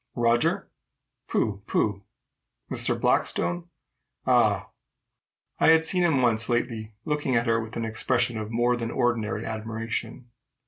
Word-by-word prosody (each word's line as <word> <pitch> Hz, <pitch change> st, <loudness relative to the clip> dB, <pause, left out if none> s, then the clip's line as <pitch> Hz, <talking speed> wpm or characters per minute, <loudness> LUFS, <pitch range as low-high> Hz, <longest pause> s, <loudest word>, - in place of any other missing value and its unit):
Roger? 120 Hz, 0 st, +1 dB, 0.6 s
Pooh! 100 Hz, -2 st, -1 dB
pooh! 105 Hz, -2 st, 0 dB, 0.7 s
Mr. -, -, 0 dB
Blackstone? 85 Hz, 0 st, 0 dB, 0.6 s
Ah! -, -, +3 dB, 0.9 s
I -, -, +4 dB
had 160 Hz, 0 st, +6 dB
seen 180 Hz, +2 st, +4 dB
him 150 Hz, -7 st, +3 dB
once 115 Hz, -1 st, +2 dB
lately 115 Hz, -3 st, -2 dB
looking 150 Hz, -4 st, 0 dB
at 115 Hz, 0 st, +2 dB
her 115 Hz, -1 st, +2 dB
with 110 Hz, +1 st, -7 dB
an 115 Hz, -, -2 dB
expression 120 Hz, +1 st, 0 dB
of 110 Hz, -1 st, -5 dB
more 120 Hz, +2 st, +2 dB
than 115 Hz, -1 st, -3 dB
ordinary 115 Hz, -3 st, -1 dB
admiration. 115 Hz, +3 st, -5 dB
115 Hz, 130 wpm, -26 LUFS, 110-125 Hz, 0.9 s, had